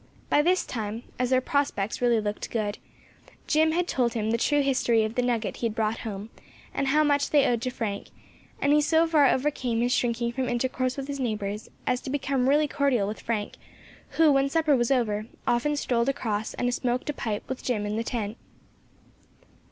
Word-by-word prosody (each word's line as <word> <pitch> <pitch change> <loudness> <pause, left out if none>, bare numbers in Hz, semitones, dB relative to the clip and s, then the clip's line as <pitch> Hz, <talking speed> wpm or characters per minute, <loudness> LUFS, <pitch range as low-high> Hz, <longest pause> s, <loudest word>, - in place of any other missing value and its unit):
By 295 - +5
this 360 +4 +2
time, 220 0 -4 0.2
as 250 -1 +1
their 260 0 +3
prospects 260 -8 -1
really 240 -2 +3
looked 210 -1 -4
good, 215 -3 -2 0.7
Jim 315 +1 +3
had 350 +1 0
told 245 -7 +1
him 220 -1 -1
the 230 - +2
true 290 +3 +2
history 245 -4 +2
of 215 0 -2
the 250 - +1
nugget 240 -3 -1
he 235 - 0
had 220 - -5
brought 220 0 0
home, 210 0 -6 0.4
and 275 - -1
how 300 +3 +4
much 285 -1 +2
they 290 -2 +4
owed 235 -2 +1
to 255 - -1
Frank; 220 -5 -4 0.5
and 285 +1 +3
he 300 - +5
so 320 +2 +3
far 310 -4 +4
overcame 255 -4 0
his 245 +1 +2
shrinking 235 0 0
from 255 +1 -2
intercourse 255 +1 -1
with 275 0 -4
his 280 -1 -4
neighbours, 210 -4 -3 0.2
as 250 0 0
to - - -7
become 270 -2 0
really 300 +2 +4
cordial 275 -9 +1
with 210 - -5
Frank, 220 -3 -3 0.6
who, 320 -2 +6
when 275 0 +3
supper 310 -1 +3
was 240 -2 +1
over, 220 -5 0 0.2
often 270 +5 +1
strolled 245 -3 0
across 215 -5 -2
and 245 0 0
smoked 250 +4 -1
a - - -9
pipe 215 -6 -4
with 260 - -5
Jim 215 -5 -1
in 210 +1 -2
the 225 - -1
tent. 225 -2 -3
245 Hz, 200 wpm, -26 LUFS, 225-280 Hz, 0.7 s, who